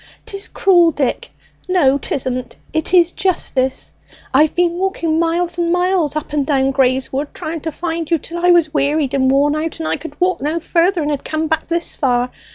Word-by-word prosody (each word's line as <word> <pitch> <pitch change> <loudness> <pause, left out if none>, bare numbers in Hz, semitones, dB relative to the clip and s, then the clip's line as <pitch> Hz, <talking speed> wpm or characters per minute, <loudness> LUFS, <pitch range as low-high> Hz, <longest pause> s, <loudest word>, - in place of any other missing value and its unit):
'Tis 395 0 -5
cruel, 350 -3 +4
Dick; 280 -5 -2 0.4
no 280 -7 +3
'tisn't, 255 -2 -3 0.2
it 315 +1 -1
is 350 -2 +5
justice! 265 -9 -1 0.4
I've 305 0 +4
been 350 -1 +2
walking 340 -4 0
miles 340 +1 0
and 340 0 +1
miles 355 -4 +1
up 305 -1 -4
and 295 -1 +1
down 270 -1 +1
Grey's 265 -1 +1
Wood, 280 +3 -1
trying 320 0 -5
to 320 - -4
find 330 0 -4
you, 335 - +3
till 340 +3 -7
I 355 - +4
was 335 -3 +4
wearied 285 -1 +1
and 260 -1 +2
worn 285 +2 +3
out, 315 +1 -3
and 320 -1 -4
I - - 0
could 290 -3 -10
walk 370 -3 +1
no 305 +4 -1
further, 345 +1 +1
and 295 - -1
had 285 - -3
come 315 0 -2
back 320 0 -1
this 340 0 -1
far! 250 -3 0
315 Hz, 200 wpm, -18 LUFS, 280-345 Hz, 0.4 s, is